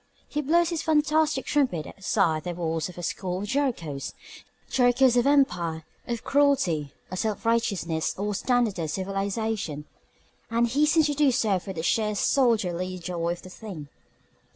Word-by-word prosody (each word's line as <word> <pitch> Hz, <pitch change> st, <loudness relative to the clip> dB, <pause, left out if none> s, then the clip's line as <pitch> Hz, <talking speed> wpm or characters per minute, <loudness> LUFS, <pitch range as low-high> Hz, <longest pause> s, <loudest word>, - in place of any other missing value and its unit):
He 300 Hz, -, -2 dB
blows 335 Hz, +4 st, +3 dB
his 335 Hz, -3 st, -2 dB
fantastic 305 Hz, -2 st, +2 dB
trumpet 255 Hz, -, +1 dB
outside 190 Hz, -5 st, 0 dB
the 175 Hz, -1 st, -4 dB
walls 165 Hz, -1 st, -2 dB
of 180 Hz, -, -12 dB
a 175 Hz, -, -6 dB
score 185 Hz, +2 st, -3 dB
of -, -, -5 dB
Jerichos: 215 Hz, -, -2 dB, 0.5 s
Jerichos 245 Hz, 0 st, +4 dB
of 245 Hz, +2 st, +3 dB
empire, 175 Hz, -, +2 dB, 0.2 s
of 235 Hz, -2 st, -3 dB
cruelty, 265 Hz, -, +2 dB, 0.2 s
of 185 Hz, -, -3 dB
self 220 Hz, 0 st, -2 dB
righteousness, 200 Hz, -8 st, 0 dB
of 205 Hz, +1 st, -2 dB
standardized 205 Hz, -, 0 dB
civilization 195 Hz, -4 st, -2 dB, 0.6 s
and 235 Hz, +1 st, +2 dB
he 280 Hz, +6 st, +2 dB
seems 315 Hz, 0 st, +4 dB
to 295 Hz, -, +1 dB
do 290 Hz, -1 st, +3 dB
so 215 Hz, -6 st, +1 dB
for 195 Hz, -, -7 dB
the 160 Hz, -3 st, -5 dB
sheer 210 Hz, +2 st, +1 dB
soldierly 185 Hz, -8 st, +1 dB
joy 170 Hz, -1 st, -2 dB
of 175 Hz, -, -11 dB
the 185 Hz, -, -10 dB
thing. 180 Hz, -9 st, -9 dB
210 Hz, 155 wpm, -26 LUFS, 175-265 Hz, 0.6 s, Jerichos